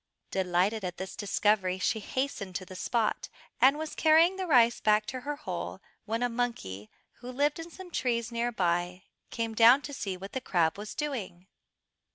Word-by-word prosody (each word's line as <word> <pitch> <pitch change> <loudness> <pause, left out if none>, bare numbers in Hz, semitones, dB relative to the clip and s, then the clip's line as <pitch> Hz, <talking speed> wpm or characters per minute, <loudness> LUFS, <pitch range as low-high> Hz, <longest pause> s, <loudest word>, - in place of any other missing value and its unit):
Delighted 190 +3 +1
at 180 -1 -4
this 190 0 -6
discovery, 200 -2 +1
she 205 +4 0
hastened 215 -6 -3
to 185 - -3
the 185 - -11
spot, 225 +3 -1 0.3
and 270 +3 +6
was 315 0 -5
carrying 325 +4 +5
the 380 -1 -4
rice 240 -6 +5
back 210 0 +3
to 255 +3 -5
her 290 +3 -3
hole 300 +1 -5 0.3
when 225 +2 -1
a - - +3
monkey, 230 - -3 0.3
who 250 +1 -7
lived 290 +4 +1
in 330 +1 -7
some 360 +1 -11
trees 235 -5 -1
near 235 +1 -1
by, 180 -2 -1 0.3
came 230 -1 -3
down 240 +5 +6
to 285 - -7
see 195 -8 -4
what 195 +2 -9
the 260 - -2
crab 170 -8 +1
was 210 +1 -7
doing. 225 - -4
230 Hz, 185 wpm, -29 LUFS, 190-265 Hz, 0.3 s, and